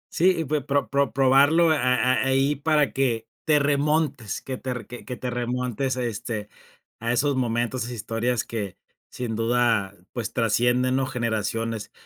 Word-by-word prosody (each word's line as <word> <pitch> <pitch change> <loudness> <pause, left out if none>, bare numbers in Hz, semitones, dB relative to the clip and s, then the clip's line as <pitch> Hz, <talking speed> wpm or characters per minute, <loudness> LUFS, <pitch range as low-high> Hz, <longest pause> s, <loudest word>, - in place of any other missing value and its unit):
Sí, 180 +3 +5
y - - -3
pues 150 0 -1
pro 140 0 0
pro 140 -3 +2
probarlo 140 +6 +5
a 155 - +2
a 125 0 +2
ahí 135 +2 +2
para 150 -1 +1
que 120 -4 0 0.2
te 155 -2 +4
remontes 145 -4 0
que 130 -1 -4
te 125 -3 -4
que 120 +2 -10
te 125 - -4
remontes, 125 +1 -2
este, 110 -3 -3 0.5
a 115 +1 -1
esos 140 +3 +1
momentos, 120 0 -1
a - - -1
esas 125 - -5
historias 115 +2 -1
que 105 -5 -5 0.3
sin 120 -3 -4
duda, 115 -3 +1 0.2
pues 120 -3 -4
trascienden, 120 +3 +2
¿no? 135 -1 0
Generaciones. 115 -2 -2
125 Hz, 160 wpm, -25 LUFS, 115-140 Hz, 0.5 s, Sí